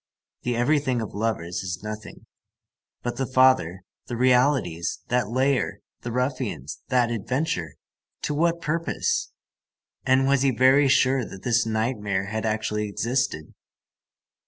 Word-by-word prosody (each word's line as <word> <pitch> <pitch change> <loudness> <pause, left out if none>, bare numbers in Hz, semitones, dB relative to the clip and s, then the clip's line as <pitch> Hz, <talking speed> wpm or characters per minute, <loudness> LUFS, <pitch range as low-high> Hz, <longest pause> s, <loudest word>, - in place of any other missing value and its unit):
The 120 -1 -1
everything 130 +1 +1
of 110 - -5
lovers 100 -5 -2
is 95 0 -5
nothing. 105 -1 -8 0.8
But 120 - -3
the 135 -1 -1
father, 130 -9 +3 0.2
the 120 - -4
realities, 125 - +2
that 125 -3 +1
lair, 130 +2 0 0.2
the 120 - -5
ruffians, 125 - -3
that 120 -2 +2
adventure, 120 - -2 0.5
to 150 - -1
what 170 +3 +1
purpose? 165 +2 -1 0.7
And 130 +1 +3
was 140 0 +3
he 135 - +3
very 130 +3 +5
sure 135 -1 +3
that 95 - -10
this 120 -1 +2
nightmare 110 -4 -1
had 110 +2 -3
actually 105 -1 -1
existed? 115 - -2
120 Hz, 130 wpm, -25 LUFS, 105-130 Hz, 0.8 s, very